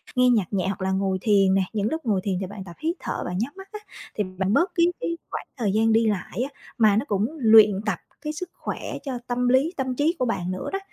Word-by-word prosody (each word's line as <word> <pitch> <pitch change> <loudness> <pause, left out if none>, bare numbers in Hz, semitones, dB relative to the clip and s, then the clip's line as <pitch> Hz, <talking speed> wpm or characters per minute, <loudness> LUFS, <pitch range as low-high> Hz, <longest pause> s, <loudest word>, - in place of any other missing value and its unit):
nghe 250 0 +5
nhạc 215 -6 +1
nhẹ 190 -1 0
hoặc 195 -1 -3
là 190 - 0
ngồi 190 0 0
thiền 195 -3 +4
nè. 195 0 +3
Những 210 0 0
lúc 320 -3 -3
ngồi 200 -4 +1
thiền 190 -3 -1
thì 190 - -3
bạn 200 0 -8
tập 175 -2 -11
hít 325 +3 -1
thở - - -4
bạn 180 0 -3
nhắm 240 +7 -2
mắt 385 0 -11
á 425 - -6 0.4
thì 210 - 0
bạn 190 +1 +1
bớt 345 - +3
cái 340 -2 +5
cái 335 0 -2
khoảng - - -5
thời 220 -6 0
gian 220 +1 +3
đi 225 0 +4
lại 210 +2 -2
á, - - -26 0.2
mà 215 -4 +5
nó 235 - 0
cũng 205 -2 +1 0.2
luyện 215 -3 +7
tập 205 -5 -1 0.2
cái 300 -1 -4
sức 355 +4 -6
khỏe - - -5 0.2
cho 260 -4 -4
tâm 245 0 0
lý, 275 +7 +3
tâm 260 -2 -2
trí 305 +6 +1
của 255 - +2
bạn 185 -6 -2
nữa 185 - -4
đó, 390 - 0
220 Hz, 270 wpm, -24 LUFS, 195-260 Hz, 0.4 s, luyện